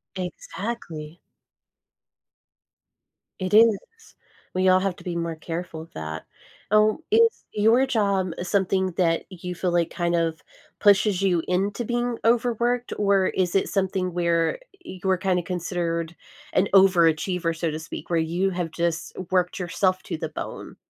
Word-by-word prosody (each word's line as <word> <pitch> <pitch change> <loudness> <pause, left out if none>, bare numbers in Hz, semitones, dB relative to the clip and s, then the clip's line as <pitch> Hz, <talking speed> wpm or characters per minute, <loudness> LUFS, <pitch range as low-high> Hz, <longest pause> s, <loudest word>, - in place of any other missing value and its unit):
Exactly. 180 -3 -6 2.2
It 185 +1 -3
is. 220 -1 +7 0.8
We 185 0 +2
all 185 0 +6
have 190 -1 -1
to - - -13
be 175 -1 -4
more 170 -1 -2
careful 165 0 -6
of 165 - -14
that. 80 0 -6 0.5
Oh, 215 0 +4
is 455 +1 +3
your 225 +5 +4
job 200 -7 +1
something 190 0 +1
that 165 -3 +2
you 180 -1 -7
feel 180 +1 -1
like 170 -1 +1
kind 175 -1 -1
of 165 -1 -1 0.4
pushes 200 -1 +4
you 180 -4 +2
into 200 +6 0
being 240 0 -1
overworked, 240 +1 +1
or 200 -2 +3
is 180 -1 -1
it 195 - +2
something 190 -2 -1
where 170 - +1 0.2
you 190 - -9
were 190 -1 +2
kinda 185 -1 0
considered 170 -2 -3 0.4
an 190 - +3
overachiever, 175 -2 +4
so 165 -1 -1
to 155 - -4
speak, 160 - -8
where 170 -1 +2
you 170 +4 0
have 175 -3 -3
just 170 -1 -2 0.2
worked 180 0 +1
yourself 185 +1 0
to - - -4
the 160 0 -4
bone? - - -7
185 Hz, 145 wpm, -24 LUFS, 170-200 Hz, 2.2 s, is